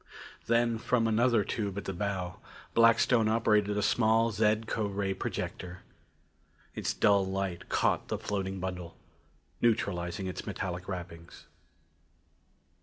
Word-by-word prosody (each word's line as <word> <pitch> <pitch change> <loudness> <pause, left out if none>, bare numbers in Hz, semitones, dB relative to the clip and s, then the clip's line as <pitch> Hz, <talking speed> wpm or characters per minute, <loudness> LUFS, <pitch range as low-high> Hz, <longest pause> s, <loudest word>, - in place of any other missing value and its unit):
Then 115 0 +2
from 115 0 +1
another 115 0 +3
tube 100 -1 -3
at 100 - -4
the 95 - -3
bow, 90 -2 -3 0.4
Blackstone 115 0 +4
operated 105 -2 +2
a 105 - +1
small 115 +1 +3
zed 110 +1 +2
co 110 -1 -1
ray 100 -1 -1
projector. 90 -1 -5 0.9
Its - - -2
dull 100 +11 +3
light 95 -2 -3
caught - - +1
the - - -2
floating 95 -1 -3
bundle, 90 -2 -5 0.6
neutralizing 95 -5 0
its 95 -2 -5
metallic 90 -1 -4
wrappings. 85 -3 -8
100 Hz, 120 wpm, -30 LUFS, 90-110 Hz, 0.9 s, Blackstone